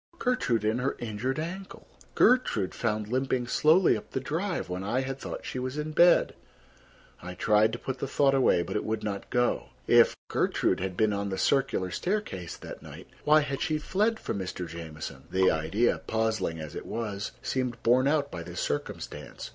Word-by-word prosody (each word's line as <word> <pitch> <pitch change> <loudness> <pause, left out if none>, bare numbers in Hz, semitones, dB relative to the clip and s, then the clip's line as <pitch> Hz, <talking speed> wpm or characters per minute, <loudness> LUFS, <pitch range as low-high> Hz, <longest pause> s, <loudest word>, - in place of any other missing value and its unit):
Gertrude 125 - 0
and 110 +3 +1
her 135 - 0
injured 120 +3 -3
ankle! 180 +5 -6 0.3
Gertrude 180 - +3
found 105 -2 -1
limping 130 +1 0
slowly 160 +8 +4
up - - -7
the - - -2
drive 165 +8 -2
when 90 +1 -4
I 120 +6 0
had 135 0 -4
thought - - -6
she 130 - -4
was 130 +3 -4
in 150 +1 -3
bed! 175 +3 +5 0.9
I 90 +1 -7
tried 105 +3 +3
to - - -2
put 130 +1 -5
the 140 - -2
thought 135 +1 +3
away, 130 -10 +4
but - - -6
it 105 - 0
would 110 0 -2
not 100 -2 -4
go. 120 0 +1 0.2
If - - +5
Gertrude - - +1
had 90 -1 -4
been 110 -1 +3
on 100 0 -2
the 95 - -3
circular 125 -10 +1
staircase 175 - -3
that - - -9
night, - - -11 0.2
why 155 +1 +6
had 140 -2 -3
she 155 -3 +1
fled 210 +8 0
from - - -3
Mr. 90 -1 -4
Jamieson? 80 -1 -8
The 95 0 +3
idea, 80 +10 +1
puzzling 110 -7 -1
as 75 -1 -7
it - - -7
was, 105 -3 -3
seemed 125 -2 -2
borne 125 +3 +4
out 145 -1 +1
by 85 - -5
this - - -7
circumstance. 75 0 -4
120 Hz, 185 wpm, -28 LUFS, 100-140 Hz, 0.9 s, why